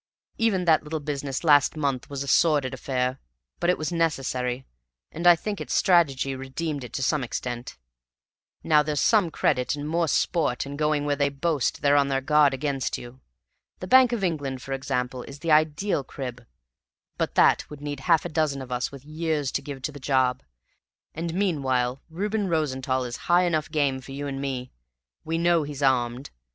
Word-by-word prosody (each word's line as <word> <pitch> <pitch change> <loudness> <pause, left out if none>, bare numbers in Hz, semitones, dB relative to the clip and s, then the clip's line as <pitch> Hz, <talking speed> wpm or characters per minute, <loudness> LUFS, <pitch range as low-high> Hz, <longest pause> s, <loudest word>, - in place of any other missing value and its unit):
Even 205 -6 +2
that 160 -2 +4
little 155 +1 -4
business 140 -2 -4
last 145 -2 +5
month 140 -4 -2
was 140 -1 -4
a - - -8
sordid 145 -3 +3
affair, 130 0 -2 0.4
but 175 - +1
it 180 - +3
was 155 +2 -3
necessary, 135 -6 -1 0.5
and 170 +2 -1
I 175 - +9
think 205 +4 -5
its - - -3
strategy 140 -7 +3
redeemed 135 +2 -4
it 125 - -8
to 135 - -2
some 145 0 +1
extent. 120 0 -5 0.9
Now 150 -1 +5
there's 150 -1 -1
some 205 -6 +3
credit, 125 -3 0
and 145 0 -5
more 165 +1 +1
sport, 155 -6 0
in 140 +1 -6
going 150 0 0
where 145 -1 +1
they 140 0 +1
boast 140 0 -1
they're 145 0 +4
on 140 -1 +3
their 135 -1 +1
guard 150 +1 +4
against 135 -1 -2
you. 120 +2 -11 0.6
The - - -5
Bank 255 +5 +6
of 230 -5 -2
England, 145 -7 -2
for 135 - -4
example, 130 -2 -2
is 140 +3 -10
the 165 +2 -2
ideal 155 +2 +2
crib; 125 -2 -7 0.7
but - - -1
that - - +4
would 150 - -9
need 145 -1 -5
half 165 +4 +2
a - - -3
dozen 150 -4 0
of 130 - -12
us 125 0 -1
with 140 -1 -12
years 155 -3 -2
to - - -1
give 140 -2 -8
to 150 - -2
the 145 - -10
job; 130 -2 +1 0.7
and 165 +1 -3
meanwhile 135 -9 0
Reuben 205 +5 -2
Rosenthall 130 -6 0
is 120 0 -5
high 175 +1 +5
enough 160 -4 0
game 140 -4 0
for 135 +1 -10
you 145 +1 -5
and 135 -1 -4
me. 130 -2 -4 0.5
We 165 +1 -2
know 170 0 +3
he's 145 -1 -5
armed. 125 -1 +1
145 Hz, 190 wpm, -25 LUFS, 130-160 Hz, 0.9 s, I